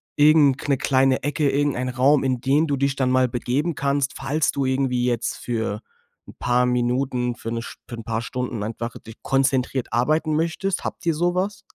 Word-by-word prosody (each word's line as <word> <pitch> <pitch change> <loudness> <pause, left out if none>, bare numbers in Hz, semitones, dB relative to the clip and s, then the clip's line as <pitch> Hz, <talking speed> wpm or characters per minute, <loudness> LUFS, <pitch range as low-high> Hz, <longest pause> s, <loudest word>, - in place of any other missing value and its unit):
irgend 145 -1 +4
'ne 140 -2 +2
kleine 130 0 +2
Ecke, 145 +1 0
irgendeinen 140 -3 0
Raum, 135 +3 +3
in 130 -2 0
den 145 +4 +3
du 140 -3 -1
dich 140 0 0
dann 130 -2 +1
mal 130 0 +3
begeben 130 +7 -1
kannst, 140 0 0
falls 145 +3 0
du 140 -1 -1
irgendwie 130 -2 0
jetzt 120 -1 -1
für 110 -3 -3 0.5
‘n - - -11
paar 125 0 +2
Minuten 125 0 0
für 115 - -6
‘ne 115 0 -2
Sch - - -9
für 120 - -6
‘n 115 - -8
paar 115 +1 -2
Stunden 125 -3 -4
einfach, 115 +2 -5
dich 110 0 -13
konzentriert 135 -1 0
arbeiten 155 +6 +1
möchtest, 170 +4 -1
habt 195 - -6
ihr 165 - +2
sowas? 180 +5 -1
130 Hz, 190 wpm, -23 LUFS, 125-145 Hz, 0.5 s, irgend